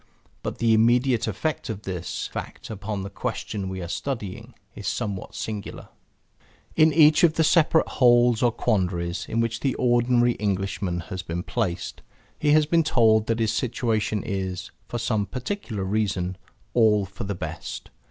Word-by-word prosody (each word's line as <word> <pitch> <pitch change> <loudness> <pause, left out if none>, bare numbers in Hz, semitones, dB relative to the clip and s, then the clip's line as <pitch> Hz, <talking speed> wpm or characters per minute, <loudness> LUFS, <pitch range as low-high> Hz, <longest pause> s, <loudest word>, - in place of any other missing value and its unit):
But - - -4
the 115 -1 +3
immediate 120 +2 +3
effect 110 +10 -2
of 105 -1 -5
this 90 -2 -4
fact - - -7
upon 100 -1 -4
the 100 - -5
question 100 0 -4
we 95 -1 -5
are - - -5
studying 115 +1 -5 0.2
is 105 - -7
somewhat 100 -6 -3
singular. 105 -2 -6 0.9
In 155 0 +5
each 155 +1 +6
of 165 -2 +5
the 160 - +3
separate 160 0 +4
holes 120 -2 +4
or 120 - +4
quandaries 90 -6 -1
in 115 - +1
which 115 0 -1
the 135 -2 0
ordinary 120 0 +3
Englishman 95 -3 -1
has 95 -1 -3
been 90 0 -4
placed, 95 -7 -3 0.4
he 150 - +1
has 155 0 +5
been 165 +2 +3
told 110 -6 +3
that 115 - +1
his 110 -2 +1
situation 115 -4 -1
is, 95 -2 -3 0.2
for 120 - -4
some 110 -3 0
particular 125 - -4
reason, 95 -2 -1 0.4
all 105 -4 +4
for 95 0 -8
the 100 0 -3
best. - - -6
110 Hz, 160 wpm, -25 LUFS, 95-120 Hz, 0.9 s, each